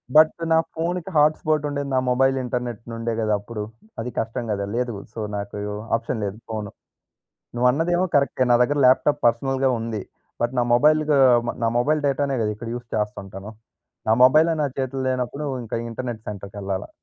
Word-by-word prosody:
But 155 Hz, 0 st, +8 dB, 0.2 s
నా 160 Hz, -, +6 dB, 0.2 s
ఫోనుకి 175 Hz, +2 st, -2 dB
hotspot 155 Hz, 0 st, +3 dB
ఉండేది 145 Hz, -1 st, -3 dB
నా 130 Hz, -, +4 dB
మొబైల్ 135 Hz, +2 st, +3 dB
ఇంటర్‌నేట్ 125 Hz, -3 st, -3 dB
నుండే 115 Hz, 0 st, -3 dB
గదా! 110 Hz, -1 st, +1 dB
అప్పుడు 105 Hz, +1 st, -7 dB, 0.4 s
అది 115 Hz, -, -3 dB
కష్టం 115 Hz, +1 st, -2 dB
గదా! 100 Hz, -1 st, -1 dB
లేదు, 125 Hz, -1 st, -1 dB, 0.2 s
సో, -, -, -7 dB, 0.2 s
నాకు 100 Hz, 0 st, -5 dB, 0.4 s
ఆప్షన్ 115 Hz, 0 st, -3 dB
లేదు 100 Hz, +1 st, -4 dB
ఫోను. 105 Hz, -2 st, -4 dB, 0.8 s
నువ్వు 120 Hz, +1 st, +2 dB
అన్నదేమో 175 Hz, +6 st, +1 dB
కరెక్టే 140 Hz, -2 st, +2 dB
నా 120 Hz, -, +7 dB
దగ్గర 145 Hz, +4 st, +1 dB
ల్యాప్‌టాప్ 145 Hz, +3 st, +3 dB
పర్సనల్‌గా 135 Hz, +3 st, +2 dB
ఉంది. 110 Hz, -3 st, -3 dB, 0.4 s
బట్ 120 Hz, +2 st, 0 dB
నా 120 Hz, -, +4 dB
మొబైల్ 150 Hz, +5 st, +5 dB
గు 145 Hz, -, +5 dB, 0.3 s
మ -, -, 0 dB
నా -, -, +3 dB
మొబైల్ 150 Hz, +5 st, +2 dB
డేటా‌నే 140 Hz, -1 st, 0 dB
గదా 105 Hz, -, 0 dB
ఇక్కడ 115 Hz, +1 st, -7 dB
యూజ్ 120 Hz, -1 st, -9 dB
చేస్తుంటాను. 105 Hz, -1 st, -4 dB, 0.6 s
నా 110 Hz, -, +5 dB
మొబైలే 155 Hz, +5 st, +5 dB
నా -, -, +2 dB
చేతులు 135 Hz, 0 st, -2 dB
లేనప్పుడు 130 Hz, +3 st, -2 dB, 0.2 s
ఇంక 110 Hz, -, -6 dB, 0.2 s
ఇంటర్‌నేట్ 120 Hz, -1 st, -5 dB
సెంటర్‌కెళ్ళాలా. 100 Hz, -1 st, -5 dB
125 Hz, 170 wpm, -23 LUFS, 110-145 Hz, 0.8 s, బట్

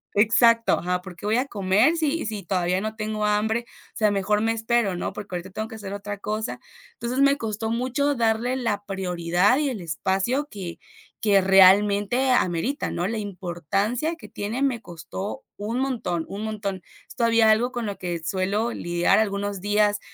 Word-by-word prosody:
Exacto, 230 Hz, +2 st, +4 dB
ajá 180 Hz, +1 st, -1 dB
porque 190 Hz, +2 st, -8 dB
voy 220 Hz, +3 st, +2 dB
a 260 Hz, -, +1 dB
comer 210 Hz, -, +2 dB
sí 320 Hz, -2 st, 0 dB
sí 215 Hz, -2 st, -4 dB
todavía 180 Hz, +1 st, 0 dB
no 215 Hz, 0 st, -4 dB
tengo 215 Hz, -1 st, -2 dB
hambre, 220 Hz, +3 st, +1 dB, 0.3 s
o -, -, -12 dB
sea, 215 Hz, -2 st, +3 dB
mejor 205 Hz, +1 st, +1 dB
me 225 Hz, 0 st, +2 dB
espero, 225 Hz, -4 st, +1 dB
¿no?, -, -, -3 dB
porque 200 Hz, -3 st, -7 dB
ahorita 180 Hz, +2 st, -6 dB
tengo 220 Hz, +3 st, -4 dB
que 225 Hz, -, -9 dB
hacer 200 Hz, -2 st, -7 dB
otra 205 Hz, 0 st, -5 dB
cosa, 215 Hz, +3 st, -3 dB, 0.3 s
entonces, 240 Hz, +3 st, -3 dB
me 280 Hz, 0 st, +5 dB
costó 220 Hz, -1 st, -3 dB
mucho 260 Hz, +4 st, 0 dB
darle 230 Hz, +2 st, +1 dB
la 210 Hz, -5 st, -1 dB
prioridad 180 Hz, +3 st, +1 dB
y 290 Hz, -2 st, +1 dB
el 220 Hz, -7 st, -5 dB
espacio 190 Hz, -, -1 dB
que 185 Hz, -5 st, -7 dB, 0.4 s
que 200 Hz, -3 st, +4 dB
realmente 200 Hz, +6 st, +5 dB
amerita, 245 Hz, -, 0 dB
¿no? 175 Hz, -, -2 dB
La 225 Hz, +1 st, -2 dB
importancia 200 Hz, -, -2 dB
que -, -, -13 dB
tiene 220 Hz, +6 st, -4 dB
me 255 Hz, -5 st, +1 dB
costó 175 Hz, +3 st, -7 dB
un 220 Hz, +5 st, -3 dB
montón, 230 Hz, -11 st, -1 dB
un 205 Hz, +2 st, -5 dB
montón. 200 Hz, -4 st, -4 dB, 0.3 s
Es -, -, -12 dB
todavía 230 Hz, -2 st, +4 dB
algo 245 Hz, +4 st, +2 dB
con 240 Hz, -2 st, -3 dB
lo 200 Hz, -1 st, -4 dB
que 175 Hz, -3 st, -4 dB
suelo 200 Hz, +6 st, 0 dB
lidiar 175 Hz, +2 st, +1 dB
algunos 200 Hz, -2 st, -1 dB
días, 205 Hz, +1 st, +2 dB
210 Hz, 180 wpm, -24 LUFS, 190-230 Hz, 0.4 s, me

